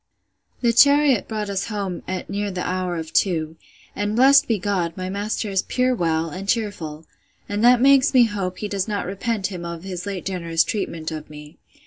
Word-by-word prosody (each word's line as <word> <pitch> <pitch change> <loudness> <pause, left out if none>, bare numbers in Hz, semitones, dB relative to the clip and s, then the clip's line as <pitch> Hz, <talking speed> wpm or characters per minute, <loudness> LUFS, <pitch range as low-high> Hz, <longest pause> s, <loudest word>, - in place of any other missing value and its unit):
The 235 -2 +3
chariot 280 -1 +5
brought 215 -2 -3
us 195 -1 -2
home 200 -5 -4
at 185 0 -4
near 205 +1 -2
the 185 -2 -4
hour 185 -1 -2
of 160 -1 -6
two; 160 -4 +1 0.4
and, 205 +1 -2
blessed 275 +3 +6
be 225 - +1
God, 180 -3 -2
my 185 0 -4
master 205 +2 -2
is 195 -1 +2
pure 255 0 0
well, 165 -6 0
and 195 +4 -7
cheerful; 170 -9 -2 0.4
and 205 +2 -2
that 245 0 +6
makes 275 +2 +5
me 255 -2 +6
hope 200 -5 -2
he 210 - -4
does 200 -1 -2
not 205 -2 -2
repent 200 +2 -2
him 180 -2 -6
of 170 0 -6
his 185 -1 -6
late 195 -3 -5
generous 170 -3 0
treatment 165 -6 -4
of 155 -1 -7
me. 150 +1 -12
195 Hz, 195 wpm, -22 LUFS, 175-215 Hz, 0.4 s, blessed